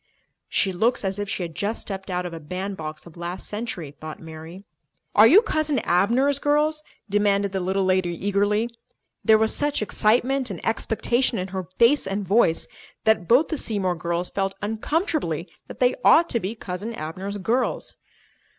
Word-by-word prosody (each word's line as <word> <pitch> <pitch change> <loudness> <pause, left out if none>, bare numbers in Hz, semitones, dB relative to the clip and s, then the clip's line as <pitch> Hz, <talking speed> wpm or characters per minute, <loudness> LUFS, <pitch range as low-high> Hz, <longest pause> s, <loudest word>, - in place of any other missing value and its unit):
She 190 - +1
looks 225 +4 +1
as 190 +1 -1
if 205 -1 -3
she 185 - -2
had 165 -2 -6
just 205 +8 -2
stepped 195 -1 -6
out 180 0 -2
of 175 - -5
a 165 - -6
bandbox 160 -1 -5
of 170 -1 -14
last 175 +2 -5
century, 210 - -5
thought 155 +1 -9
Mary. 160 +3 -10 0.5
"Are 215 +2 +8
you 390 - +7
Cousin 310 - 0
Abner's 240 +9 +2
girls?" 300 +1 +2 0.3
demanded 200 -1 +2
the 190 - -1
little 190 +1 0
lady 185 -1 +2
eagerly. 205 +5 0 0.5
There 220 - +6
was 220 0 +2
such 290 0 0
excitement 250 +5 +1
and 185 -5 -5
expectation 235 +2 0
in 185 0 -3
her 185 -2 -5
face 235 -1 +4
and 195 0 -3
voice 195 -5 +3 0.4
that 220 -6 +2
both 255 +7 +4
the 315 - -2
Seymour 200 -8 -1
girls 170 +1 -2
felt 195 -1 -1
uncomfortably 220 - -1 0.2
that - - -10
they 250 0 +4
ought 335 +2 +6
to 235 - +1
be 205 +3 -4
"Cousin 210 +3 -5
Abner's 185 +6 -5
girls." 230 +6 -1
200 Hz, 170 wpm, -24 LUFS, 180-235 Hz, 0.5 s, Are